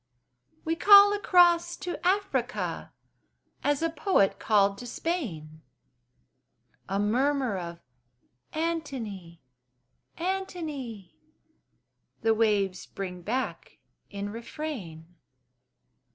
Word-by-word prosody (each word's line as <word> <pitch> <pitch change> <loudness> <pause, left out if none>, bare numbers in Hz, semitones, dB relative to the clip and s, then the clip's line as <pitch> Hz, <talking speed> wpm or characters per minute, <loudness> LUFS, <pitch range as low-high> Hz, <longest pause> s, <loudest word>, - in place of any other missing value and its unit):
We 325 +1 0
call 405 +3 +8
across 350 -3 +4
to 355 - -6
Africa, 390 +2 -1 0.7
As 290 +2 +1
a 330 - +2
poet 310 - +2
called 200 -2 +2
to 245 - -7
Spain: 170 - -4 1.3
A 195 - 0
murmur 255 +3 +1
of 170 -2 -6 0.7
"Antony! 255 - -4 0.7
Antony!" 315 - -5 1.0
The 225 0 +4
waves 205 -4 +1
bring 180 -2 -6
back 245 +9 -4 0.3
in 200 0 -5
refrain. 230 - -6
245 Hz, 80 wpm, -28 LUFS, -, 1.3 s, call